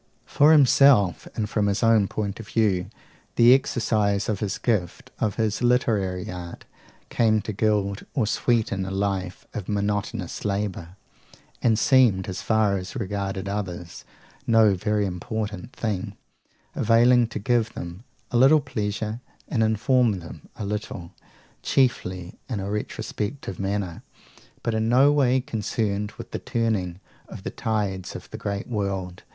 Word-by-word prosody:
For 145 Hz, +2 st, +4 dB
himself, 135 Hz, -, +5 dB
and 105 Hz, -, -1 dB
from 105 Hz, -1 st, 0 dB
his 100 Hz, +4 st, 0 dB
own 115 Hz, -3 st, +4 dB
point 100 Hz, 0 st, -4 dB
of 110 Hz, -, -9 dB
view, 100 Hz, -6 st, +1 dB, 0.5 s
the 120 Hz, +1 st, +7 dB
exercise 110 Hz, -7 st, +1 dB
of 105 Hz, -3 st, -1 dB
his 100 Hz, -3 st, -2 dB
gift, 115 Hz, +3 st, -2 dB
of 110 Hz, -5 st, 0 dB
his 110 Hz, -1 st, -1 dB
literary 110 Hz, -7 st, +1 dB
art, 90 Hz, -1 st, -8 dB, 0.4 s
came 110 Hz, -2 st, +3 dB
to 110 Hz, -, -4 dB
gild 100 Hz, -1 st, 0 dB
or 130 Hz, -6 st, +2 dB
sweeten 110 Hz, -3 st, 0 dB
a 95 Hz, -, -4 dB
life 95 Hz, -2 st, -2 dB
of 100 Hz, -, -6 dB
monotonous 105 Hz, -1 st, -2 dB
labour, 100 Hz, -4 st, -3 dB, 0.7 s
and 115 Hz, -2 st, +3 dB
seemed, 115 Hz, -7 st, +4 dB
as 95 Hz, -1 st, -4 dB
far 110 Hz, -3 st, +2 dB
as 95 Hz, +4 st, -7 dB
regarded 100 Hz, -3 st, -3 dB
others, 90 Hz, -4 st, -5 dB, 0.4 s
no 110 Hz, -3 st, +5 dB
very 105 Hz, +2 st, 0 dB
important 105 Hz, +3 st, -4 dB
thing; 105 Hz, -5 st, -3 dB, 0.6 s
availing 120 Hz, +2 st, +4 dB
to 115 Hz, -, -6 dB
give 115 Hz, +1 st, 0 dB
them 85 Hz, +4 st, -7 dB, 0.3 s
a 120 Hz, -, +2 dB
little 135 Hz, +5 st, +6 dB
pleasure, 110 Hz, -3 st, -3 dB, 0.3 s
and 115 Hz, -, 0 dB
inform 115 Hz, +2 st, +3 dB
them 85 Hz, -1 st, -11 dB
a 105 Hz, -, -5 dB
little, 100 Hz, -4 st, -5 dB, 0.5 s
chiefly 95 Hz, -9 st, 0 dB
in 115 Hz, -5 st, -2 dB
a 100 Hz, +1 st, -4 dB
retrospective 105 Hz, 0 st, -4 dB
manner, 95 Hz, -3 st, -2 dB, 0.6 s
but 115 Hz, -, -1 dB
in 110 Hz, 0 st, 0 dB
no 135 Hz, +4 st, +6 dB
way 130 Hz, -3 st, +3 dB
concerned 105 Hz, -3 st, -2 dB
with -, -, -10 dB
the -, -, -3 dB
turning 100 Hz, -7 st, -1 dB, 0.3 s
of -, -, -10 dB
the -, -, -4 dB
tides 100 Hz, -4 st, -2 dB
of -, -, -8 dB
the -, -, -6 dB
great 100 Hz, -1 st, -3 dB
world. 95 Hz, -5 st, -3 dB
105 Hz, 145 wpm, -24 LUFS, 95-115 Hz, 0.7 s, the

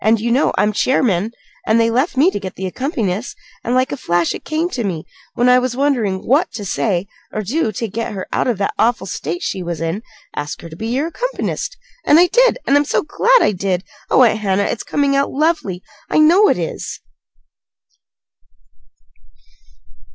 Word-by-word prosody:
You 235 Hz, +2 st, -2 dB
know 260 Hz, +5 st, +3 dB
I'm 210 Hz, +1 st, +2 dB
chairman, 220 Hz, -4 st, +1 dB, 0.4 s
and 220 Hz, +1 st, +4 dB
they 230 Hz, 0 st, +3 dB
left 260 Hz, +4 st, 0 dB
me 320 Hz, +8 st, +5 dB
to -, -, -3 dB
get 190 Hz, -2 st, -7 dB
the 190 Hz, -, -5 dB
accompanist; 220 Hz, -, -3 dB, 0.3 s
and 240 Hz, -, 0 dB
like 255 Hz, 0 st, +2 dB
a -, -, -1 dB
flash 175 Hz, -7 st, 0 dB
it -, -, -8 dB
came 315 Hz, +2 st, -1 dB
to 245 Hz, -, -2 dB
me, 175 Hz, -6 st, -3 dB, 0.3 s
when 245 Hz, -, +2 dB
I 250 Hz, 0 st, +6 dB
was 250 Hz, -1 st, -2 dB
wondering 235 Hz, -10 st, 0 dB
what 285 Hz, +7 st, +2 dB
to 210 Hz, -2 st, -6 dB
say 190 Hz, -1 st, 0 dB, 0.3 s
or 215 Hz, -, -3 dB
do 245 Hz, -, 0 dB
to 230 Hz, +4 st, -3 dB
get 225 Hz, +2 st, -4 dB
her 190 Hz, -2 st, -5 dB
out -, -, +1 dB
of 240 Hz, -5 st, 0 dB
that 200 Hz, -, -1 dB
awful 230 Hz, -4 st, +2 dB
state 175 Hz, -2 st, -4 dB
she 190 Hz, -, -2 dB
was 170 Hz, -2 st, -4 dB
in 165 Hz, +5 st, -2 dB, 0.3 s
'Ask 145 Hz, 0 st, -4 dB
her 165 Hz, -, -9 dB
to 160 Hz, -, -10 dB
be 220 Hz, +6 st, -5 dB
your 260 Hz, +6 st, 0 dB
accompanist.' -, -, -3 dB, 0.3 s
And 300 Hz, -, +6 dB
I 355 Hz, -, +7 dB
did. -, -, +3 dB
And 280 Hz, -, +3 dB
I'm 290 Hz, -, +2 dB
so -, -, 0 dB
glad -, -, +3 dB
I -, -, +3 dB
did! 185 Hz, -2 st, -1 dB, 0.3 s
Oh, 260 Hz, -, +5 dB
Aunt 220 Hz, -2 st, +3 dB
Hannah, 200 Hz, -1 st, +1 dB
it's 215 Hz, -, -2 dB
coming 280 Hz, -1 st, 0 dB
out 275 Hz, 0 st, +2 dB
lovely! 280 Hz, -, -1 dB, 0.3 s
I -, -, +1 dB
know 345 Hz, +7 st, +6 dB
it -, -, +2 dB
is." 170 Hz, -2 st, -4 dB
230 Hz, 195 wpm, -18 LUFS, 190-280 Hz, 0.4 s, I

